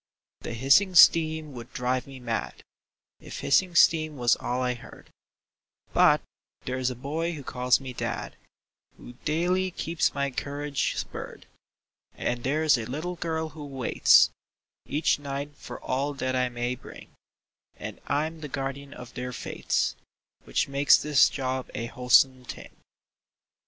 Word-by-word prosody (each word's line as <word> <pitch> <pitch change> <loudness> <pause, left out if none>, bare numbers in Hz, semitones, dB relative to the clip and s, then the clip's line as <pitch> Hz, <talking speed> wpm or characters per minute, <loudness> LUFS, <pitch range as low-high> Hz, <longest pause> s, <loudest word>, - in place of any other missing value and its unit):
The 120 - -6
hissing 140 - +4
steam 160 -3 +6
would 120 0 -9
drive 125 +1 -1
me 135 -1 -10
mad 115 -2 -4 0.6
If - - -8
hissing 180 +4 +2
steam 155 -3 +4
was 120 -2 +3
all 125 +1 -2
I 125 0 +1
heard; 120 - -14 0.8
But - - +5 0.4
there's 130 0 -1
a 125 - -5
boy 155 +7 -3
who 145 -3 -8
calls 125 -1 +1
me 130 -2 -7
dad - - -4 0.6
Who 120 - -12
daily 180 +4 +1
keeps 170 -2 -1
my 140 0 -1
courage 145 +2 -2
spurred; - - -6 0.7
And 120 -1 -2
there's 150 0 +2
a 110 - -5
little 160 +7 -4
girl 160 -1 -2
who 155 0 -10
waits 135 -4 +4 0.6
Each 150 0 +1
night 140 +1 -5
for - - -9
all 140 +3 -2
that 130 -1 -2
I 125 -1 +1
may 120 0 -2
bring, 125 - -12 0.7
And - - -8
I'm 155 +3 -1
the 150 - -5
guardian 135 +1 -5
of 125 -1 -11
their 125 0 -5
fates, 120 - -2 0.5
Which - - 0
makes 140 +1 +5
this 150 -3 +4
job 130 -1 -3
a 115 - -3
wholesome 125 +1 +3
thing. - - -10
140 Hz, 145 wpm, -27 LUFS, 125-155 Hz, 0.8 s, steam